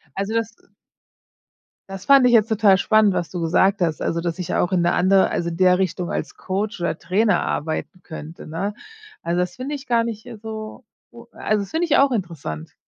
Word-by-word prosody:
Also 200 Hz, +3 st, -3 dB
das 230 Hz, 0 st, -1 dB, 1.4 s
das 195 Hz, 0 st, -8 dB
fand 275 Hz, -2 st, +6 dB
ich 245 Hz, -, +5 dB
jetzt 225 Hz, -2 st, +5 dB
total 210 Hz, -4 st, +4 dB
spannend, 215 Hz, 0 st, +3 dB
was 175 Hz, -2 st, -2 dB
du 175 Hz, -2 st, -5 dB
gesagt 190 Hz, +4 st, +2 dB
hast. 160 Hz, -3 st, 0 dB
Also, 170 Hz, 0 st, -1 dB
dass 170 Hz, +1 st, -3 dB
ich 180 Hz, -, -3 dB
auch 180 Hz, -, +1 dB
in 180 Hz, -2 st, +2 dB
'ne 175 Hz, +1 st, +2 dB
andere 190 Hz, +1 st, +3 dB
also 170 Hz, 0 st, -2 dB
in 165 Hz, -, -6 dB
der 185 Hz, 0 st, +4 dB
Richtung 180 Hz, -1 st, -2 dB
als -, -, -4 dB
Coach 200 Hz, +1 st, -3 dB
oder 170 Hz, -2 st, -2 dB
Trainer 205 Hz, +5 st, +1 dB
arbeiten 160 Hz, +4 st, -3 dB
könnte, 160 Hz, 0 st, -9 dB
ne? 190 Hz, +6 st, -3 dB, 0.5 s
Also, 170 Hz, +1 st, -1 dB
das 180 Hz, 0 st, -2 dB
finde 275 Hz, +4 st, -4 dB
ich 285 Hz, 0 st, -9 dB
gar 235 Hz, -1 st, +2 dB
nicht, 220 Hz, -1 st, -6 dB
äh, 240 Hz, -3 st, -9 dB
so, 220 Hz, +2 st, -8 dB, 0.3 s
o 235 Hz, 0 st, -14 dB
also, 215 Hz, -1 st, -1 dB
das 195 Hz, -, -11 dB
finde 330 Hz, +2 st, 0 dB
ich 310 Hz, -, +3 dB
auch 275 Hz, -1 st, +4 dB
interessant. 165 Hz, -, -5 dB
195 Hz, 210 wpm, -22 LUFS, 175-220 Hz, 1.4 s, fand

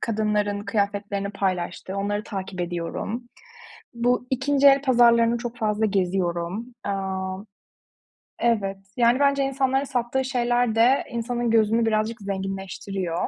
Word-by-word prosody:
kadınların 210 Hz, -2 st, 0 dB
kıyafetlerini 200 Hz, -1 st, -1 dB
paylaştığı 190 Hz, -1 st, -3 dB
onları 205 Hz, +1 st, -1 dB
takip 190 Hz, -3 st, -5 dB
ediyorum. 175 Hz, +7 st, -4 dB, 0.7 s
Bu 245 Hz, +1 st, +1 dB
2'nci 275 Hz, +2 st, +2 dB
el 275 Hz, 0 st, +7 dB
pazarlarını 235 Hz, -3 st, +4 dB
çok 240 Hz, 0 st, -6 dB
fazla 215 Hz, -1 st, 0 dB
geziyorum. 185 Hz, +1 st, -1 dB, 0.2 s
Aaa, 190 Hz, -1 st, -3 dB, 1.0 s
evet, 205 Hz, -5 st, +1 dB, 0.2 s
yani 240 Hz, +1 st, +4 dB
bence 280 Hz, -1 st, +3 dB
insanların 270 Hz, 0 st, +1 dB
sattığı 265 Hz, -1 st, -1 dB
şeyler 245 Hz, -2 st, +1 dB
de 245 Hz, +4 st, +4 dB
insanın 235 Hz, 0 st, -2 dB
gözünü 225 Hz, +1 st, +3 dB
birazcık 220 Hz, +1 st, 0 dB
zenginleştiriyor. 195 Hz, -2 st, -3 dB
220 Hz, 115 wpm, -24 LUFS, 195-240 Hz, 1.0 s, el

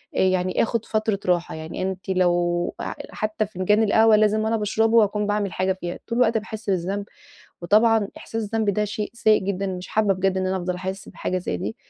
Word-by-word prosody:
آآ -, -, 0 dB
يعني 185 Hz, -1 st, +2 dB
آخد 230 Hz, 0 st, -2 dB
فترة 215 Hz, -2 st, 0 dB
راحة 175 Hz, -2 st, +1 dB
يعني. 160 Hz, +2 st, -6 dB
أنتِ 190 Hz, 0 st, -4 dB
لو 175 Hz, -1 st, +1 dB
ح -, -, -4 dB, 0.2 s
حتّى 215 Hz, 0 st, -2 dB
فنجان 210 Hz, +2 st, +1 dB
القهوة 220 Hz, +1 st, +5 dB
لازم 215 Hz, 0 st, +3 dB
وأنا 220 Hz, +1 st, +1 dB
باشربه 220 Hz, +2 st, +2 dB
وأكون 210 Hz, -1 st, +2 dB
باعمل 205 Hz, -2 st, -1 dB
حاجة 185 Hz, 0 st, +1 dB
فيها، 175 Hz, 0 st, -5 dB
طول 230 Hz, 0 st, -2 dB
الوقت 230 Hz, -2 st, +3 dB
باحس 220 Hz, 0 st, -7 dB
بالذنب، 190 Hz, +2 st, -2 dB, 0.6 s
وطبعًا 215 Hz, +2 st, +4 dB
إحساس 225 Hz, 0 st, -5 dB
الذنب 215 Hz, 0 st, 0 dB
ده 210 Hz, +2 st, 0 dB
شيء 210 Hz, 0 st, -4 dB
سيئ 220 Hz, -2 st, +3 dB
جدًا، 195 Hz, 0 st, -2 dB
مش 185 Hz, -1 st, -5 dB
حابّة 210 Hz, -2 st, +2 dB
بجد 190 Hz, 0 st, 0 dB
إن 185 Hz, -, -1 dB
أنا 190 Hz, 0 st, 0 dB
أفضل 180 Hz, 0 st, -2 dB
أحس 190 Hz, +2 st, -5 dB
بحاجة 185 Hz, -, -3 dB
زي 130 Hz, -, -3 dB
دي. 100 Hz, +5 st, -5 dB
200 Hz, 200 wpm, -23 LUFS, 185-215 Hz, 0.6 s, القهوة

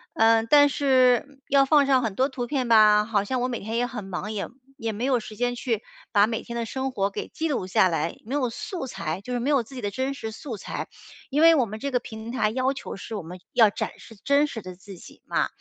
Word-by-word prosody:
呃， 225 Hz, 0 st, +4 dB
但 290 Hz, +5 st, +6 dB
是， 260 Hz, -3 st, +3 dB
嗯， 275 Hz, -1 st, -22 dB
要 275 Hz, 0 st, +5 dB
放 285 Hz, 0 st, +5 dB
上 265 Hz, -2 st, +3 dB
很 220 Hz, -5 st, -2 dB
多 260 Hz, +4 st, +2 dB
图 250 Hz, -3 st, -5 dB
片 260 Hz, -3 st, -1 dB
吧， 215 Hz, -2 st, +6 dB
好 210 Hz, -2 st, +1 dB
像 255 Hz, +5 st, -2 dB
我 250 Hz, -, +1 dB
每 240 Hz, -2 st, -3 dB
天 220 Hz, +3 st, -3 dB
也 245 Hz, -, +1 dB
很 245 Hz, -5 st, -6 dB
忙， 195 Hz, +3 st, -5 dB
也 205 Hz, -, -2 dB, 0.3 s
也 225 Hz, -1 st, -3 dB
没 220 Hz, +4 st, -3 dB
有 260 Hz, -3 st, +2 dB
时 215 Hz, -1 st, -10 dB
间 245 Hz, 0 st, 0 dB
去 235 Hz, -3 st, -2 dB, 0.3 s
把 205 Hz, 0 st, +5 dB
每 225 Hz, -1 st, -2 dB
天 235 Hz, -, -6 dB
的 235 Hz, -, -2 dB
生 265 Hz, +3 st, -3 dB
活 200 Hz, -5 st, 0 dB
给 195 Hz, -, -6 dB
记 325 Hz, -, -3 dB
录 250 Hz, -11 st, -2 dB
下 185 Hz, 0 st, +4 dB
来， 165 Hz, -1 st, -2 dB
没 260 Hz, +6 st, -3 dB
有 255 Hz, -4 st, +1 dB
素 340 Hz, -, -5 dB
材， 170 Hz, -5 st, -4 dB
就 250 Hz, -, -8 dB
是 245 Hz, -, 0 dB
没 255 Hz, +5 st, -1 dB
有 275 Hz, -4 st, +3 dB
自 230 Hz, -, -16 dB
己 250 Hz, -, -6 dB
的 205 Hz, -, -1 dB
真 260 Hz, +6 st, -2 dB
实 225 Hz, -5 st, -6 dB
素 240 Hz, -1 st, -7 dB
材。 -, -, -6 dB, 0.4 s
因 290 Hz, +3 st, +1 dB
为 330 Hz, 0 st, +8 dB
我 265 Hz, -5 st, +3 dB
们 215 Hz, 0 st, -7 dB
这 280 Hz, -, -3 dB
个 250 Hz, -, +2 dB
平 220 Hz, 0 st, -8 dB
台 215 Hz, -5 st, +1 dB
要 260 Hz, +3 st, 0 dB
求 270 Hz, -, -7 dB
是 220 Hz, -, -7 dB
我 200 Hz, -, -5 dB
们 180 Hz, +3 st, -9 dB
要 225 Hz, -3 st, +6 dB
展 -, -, -4 dB
示 225 Hz, -, -14 dB
真 280 Hz, +1 st, +4 dB
实 225 Hz, -6 st, -6 dB
的 185 Hz, -1 st, -9 dB
自 190 Hz, 0 st, -12 dB
己 -, -, -15 dB
嘛， -, -, 0 dB
235 Hz, 290 characters per minute, -25 LUFS, 210-265 Hz, 0.4 s, 为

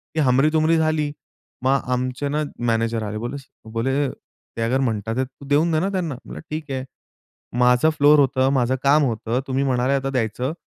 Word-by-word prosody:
ही 160 Hz, -, +2 dB
हमरी-तुमरी 155 Hz, +5 st, +3 dB
झाली. 155 Hz, -2 st, +1 dB, 0.5 s
मग 135 Hz, +1 st, +3 dB
आमचे 130 Hz, +3 st, -2 dB
ना 150 Hz, +2 st, 0 dB, 0.3 s
मॅनेजर 115 Hz, 0 st, 0 dB
आले. 105 Hz, 0 st, -4 dB
बोले 120 Hz, +5 st, -4 dB
स 135 Hz, -, -12 dB, 0.3 s
बोले 135 Hz, +4 st, 0 dB
"ते 115 Hz, -, -12 dB
अगर 120 Hz, +4 st, +1 dB
म्हणतात, 115 Hz, -3 st, -1 dB
तू 135 Hz, +2 st, -16 dB
देऊन 150 Hz, +4 st, +3 dB
दे 155 Hz, -, +2 dB
ना 190 Hz, +4 st, 0 dB
त्यांना." 175 Hz, -7 st, -2 dB
म्हणलं, -, -, -8 dB
"ठीक 155 Hz, -2 st, -5 dB
आहे." 130 Hz, -1 st, -2 dB, 0.8 s
"माझं 125 Hz, +4 st, +4 dB
फ्लोर 145 Hz, 0 st, +6 dB
होतं, 130 Hz, -1 st, +3 dB
माझं 130 Hz, -1 st, +2 dB
काम 145 Hz, +2 st, +5 dB
होतं, 115 Hz, -1 st, -1 dB
तुम्ही 135 Hz, +1 st, 0 dB
म्हणाले 130 Hz, 0 st, +1 dB
आता 135 Hz, 0 st, 0 dB
द्यायचं 125 Hz, +2 st, -1 dB
135 Hz, 180 wpm, -22 LUFS, 125-150 Hz, 0.8 s, फ्लोर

